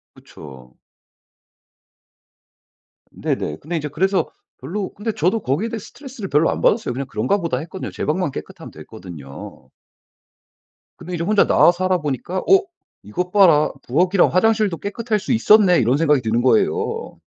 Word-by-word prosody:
그쵸. 65 Hz, -3 st, -14 dB, 2.4 s
네네. 75 Hz, -, -3 dB
근데 165 Hz, +2 st, -4 dB
제 150 Hz, -, -4 dB
그래서 190 Hz, +6 st, 0 dB, 0.3 s
별로 185 Hz, +9 st, -5 dB
근데 215 Hz, +2 st, -3 dB
저도 185 Hz, +7 st, 0 dB
거기에 150 Hz, -, -1 dB
대해 230 Hz, 0 st, -5 dB
스트레스를 250 Hz, -1 st, -9 dB
별로 150 Hz, +3 st, +3 dB
안 -, -, -4 dB
받았어요. 215 Hz, -, +1 dB
그냥 135 Hz, +2 st, -4 dB
'그런가 200 Hz, +8 st, 0 dB
보다.' 165 Hz, -9 st, -2 dB
했거든요. 170 Hz, +6 st, -7 dB
제 -, -, -5 dB
방만 160 Hz, +1 st, -1 dB
깨끗하면 -, -, -9 dB
됐거든요. 70 Hz, -7 st, -11 dB, 1.3 s
근데 180 Hz, -, -8 dB
이제 170 Hz, 0 st, -2 dB
혼자 210 Hz, +1 st, +3 dB
나와 175 Hz, -, +5 dB
살아 185 Hz, 0 st, 0 dB
보니까 150 Hz, +5 st, -4 dB
'어 385 Hz, 0 st, +6 dB, 0.4 s
이것 180 Hz, -, -4 dB
봐라. 175 Hz, -7 st, +5 dB
부엌이랑 180 Hz, +8 st, +2 dB
화장실도 215 Hz, -1 st, +2 dB
깨끗할 215 Hz, +2 st, -2 dB
수 210 Hz, -, -3 dB
있었네.' 210 Hz, -5 st, +5 dB
이런 125 Hz, +3 st, +2 dB
생각이 150 Hz, -4 st, +2 dB
드는 115 Hz, +1 st, 0 dB
거예요. 440 Hz, -, 0 dB
180 Hz, 340 characters per minute, -20 LUFS, 140-210 Hz, 2.4 s, 어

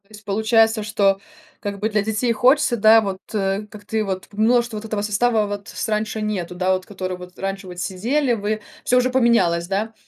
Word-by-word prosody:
То -, -, -33 dB
есть 215 Hz, -1 st, -14 dB
получается, 220 Hz, +2 st, +2 dB
что 200 Hz, -2 st, +2 dB, 0.4 s
как 200 Hz, -1 st, -5 dB
бы 215 Hz, +2 st, 0 dB
для 210 Hz, -1 st, +1 dB
детей 220 Hz, +3 st, 0 dB
хочется, 250 Hz, +2 st, +3 dB
да 220 Hz, 0 st, +6 dB
вот, 195 Hz, -3 st, -3 dB
э, 200 Hz, 0 st, -1 dB
как 205 Hz, -1 st, -13 dB
ты 220 Hz, +1 st, -1 dB
вот 190 Hz, -2 st, -4 dB
ты 205 Hz, -, -16 dB
множество 235 Hz, +1 st, +2 dB
вот 210 Hz, -, -7 dB
этого 215 Hz, -2 st, -2 dB
состава, 215 Hz, +1 st, +2 dB
вот 205 Hz, 0 st, -6 dB
с -, -, -4 dB
раньше 215 Hz, 0 st, -1 dB
нету, 190 Hz, -5 st, -3 dB
да, 185 Hz, +1 st, +1 dB
вот 185 Hz, 0 st, -2 dB
который 185 Hz, -2 st, -5 dB
вот 180 Hz, 0 st, -12 dB
раньше 195 Hz, 0 st, -4 dB
вот 180 Hz, -1 st, -8 dB
сидели 240 Hz, +10 st, 0 dB
вы, 215 Hz, 0 st, -2 dB, 0.2 s
всё 250 Hz, -, +3 dB
уже 250 Hz, 0 st, +3 dB
поменялось, 210 Hz, -10 st, +3 dB
да. 205 Hz, +4 st, -2 dB
210 Hz, 215 wpm, -21 LUFS, 195-225 Hz, 0.4 s, да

